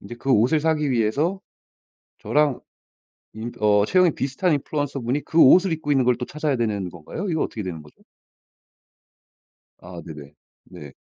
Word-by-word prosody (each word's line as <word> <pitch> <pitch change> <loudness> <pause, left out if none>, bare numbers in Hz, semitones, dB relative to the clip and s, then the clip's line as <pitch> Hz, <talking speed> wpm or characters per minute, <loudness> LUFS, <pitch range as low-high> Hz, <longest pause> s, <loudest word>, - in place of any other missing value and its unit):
인제 120 +4 -10
그 135 +3 -4
옷을 125 +8 +3
사기 150 -3 0
위해서 140 - 0 0.8
저랑 150 -3 +1 0.8
인 115 +2 -6
어 105 -1 +3
체형이 180 0 +3
비슷한 140 +6 -1
인플루언서분이 140 -2 -2
그 165 - 0
옷을 180 +6 +6
입고 150 -2 -3
있는 135 -3 +2
걸 125 -1 +2
또 125 - -4
찾아야 150 -1 -2
되는 105 -5 -2
건가요? 85 - -7
이거 160 -2 0
어떻게 110 - -5
되는 85 -4 -6
거죠? 75 - -20 1.8
아 90 -1 -10
네네. 75 -3 -11 0.3
네. 70 -2 -12
130 Hz, 310 characters per minute, -23 LUFS, 105-150 Hz, 1.8 s, 옷을